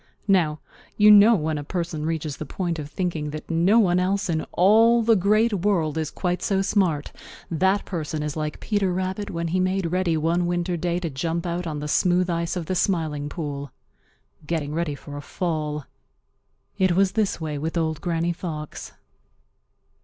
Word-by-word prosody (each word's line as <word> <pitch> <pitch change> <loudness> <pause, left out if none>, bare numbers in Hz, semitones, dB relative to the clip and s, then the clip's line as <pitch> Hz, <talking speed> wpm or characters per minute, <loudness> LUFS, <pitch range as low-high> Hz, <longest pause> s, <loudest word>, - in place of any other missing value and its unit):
Now, 165 -6 +2 0.4
you 210 0 +7
know 210 +3 +8
when 155 -4 -1
a - - -5
person 165 -1 -3
reaches 160 -3 -3
the - - -5
point 175 -3 -3
of 145 -1 -6
thinking 160 -3 -2
that 155 +2 -7
no 175 +7 +4
one 180 -5 +4
else 190 0 0
in 160 -1 -1
all 225 +5 +5
the 225 0 +4
Great 215 +4 +3
World 175 -6 +1
is 160 -2 -2
quite 180 -1 -2
so 195 -1 +1
smart, 180 -8 0 0.4
that 190 +5 +2
person 155 -4 -3
is 150 -1 -3
like 155 -1 -3
Peter 205 -4 0
Rabbit 190 +3 -3
when 170 -3 -3
he 185 +3 0
made 185 -2 0
ready 180 -3 +1
one 170 +3 +1
winter 175 0 -1
day 175 +1 -1
to 165 -3 -3
jump 165 +5 -2
out 175 0 -2
on 150 -2 -4
the 150 - -4
smooth 180 +3 +2
ice 170 +1 -1
of 175 -3 -3
the 185 - -2
Smiling 160 -6 0
Pool,—getting 145 +1 -7
ready 160 -2 -1
for 145 +1 -9
a - - -5
fall. 150 -3 -3 0.9
It 185 -2 +3
was 190 +1 +3
this 215 -6 0
way 155 -3 -4
with 160 +3 -3
Old 160 -2 -1
Granny 170 0 0
Fox. 155 -3 -7
170 Hz, 180 wpm, -24 LUFS, 155-185 Hz, 0.9 s, know